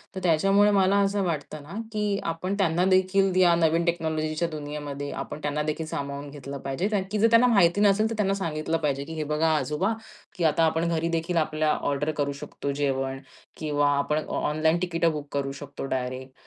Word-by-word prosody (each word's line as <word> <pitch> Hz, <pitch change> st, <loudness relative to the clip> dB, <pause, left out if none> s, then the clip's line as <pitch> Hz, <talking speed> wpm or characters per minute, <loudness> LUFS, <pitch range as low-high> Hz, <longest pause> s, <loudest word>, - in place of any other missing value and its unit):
तर 190 Hz, -, -3 dB
त्याच्यामुळे 195 Hz, +5 st, +4 dB
मला 195 Hz, 0 st, +3 dB
असं 200 Hz, 0 st, 0 dB
वाटतं 155 Hz, -3 st, -3 dB
ना, 155 Hz, +7 st, -10 dB, 0.2 s
की 210 Hz, -2 st, 0 dB
आपण 175 Hz, +4 st, -2 dB
त्यांना 180 Hz, -1 st, +2 dB
देखील 190 Hz, +1 st, +3 dB
या 175 Hz, -2 st, +6 dB
नवीन 165 Hz, +1 st, +2 dB
टेक्नॉलॉजीच्या 160 Hz, -1 st, -1 dB
दुनियेमध्ये, 145 Hz, -2 st, -5 dB
आपण -, -, -6 dB
त्यांना 150 Hz, 0 st, -1 dB
देखील 155 Hz, +1 st, -2 dB
सामावून 140 Hz, -1 st, -5 dB
घेतलं 140 Hz, -1 st, -7 dB
पाहिजे. 135 Hz, +9 st, -1 dB
कारण 205 Hz, -3 st, 0 dB
की 210 Hz, -, 0 dB
जर 225 Hz, -, +5 dB
त्यांना 235 Hz, +2 st, +6 dB
माहिती 200 Hz, -3 st, +4 dB
नसेल 210 Hz, +2 st, +4 dB
तर 230 Hz, -, -3 dB
त्यांना 195 Hz, -2 st, +1 dB
सांगितलं 155 Hz, 0 st, -1 dB
पाहिजे, 140 Hz, -3 st, -1 dB
की 160 Hz, -, -7 dB
"हे 155 Hz, -1 st, -3 dB
बघा 160 Hz, +1 st, +2 dB
आजोबा 180 Hz, +10 st, 0 dB, 0.4 s
की 175 Hz, -, -1 dB
आता 160 Hz, +1 st, +3 dB
आपण 160 Hz, +1 st, +2 dB
घरी 165 Hz, 0 st, 0 dB
देखील 165 Hz, +1 st, -1 dB
आपल्या 155 Hz, -1 st, +1 dB
ऑर्डर 145 Hz, +2 st, 0 dB
करू 140 Hz, 0 st, 0 dB
शकतो 140 Hz, -, -4 dB
जेवण 135 Hz, -1 st, -1 dB, 0.4 s
किंवा 145 Hz, -2 st, +1 dB
आपण 150 Hz, +2 st, 0 dB
ऑ -, -, -2 dB
ऑनलाईन 160 Hz, +2 st, +2 dB
तिकीटं 170 Hz, -2 st, +1 dB
बुक 150 Hz, -1 st, -6 dB
करू 140 Hz, -1 st, -1 dB
शकतो 140 Hz, 0 st, -7 dB
डायरेक्ट 130 Hz, +1 st, -5 dB
160 Hz, 195 wpm, -26 LUFS, 145-185 Hz, 0.4 s, या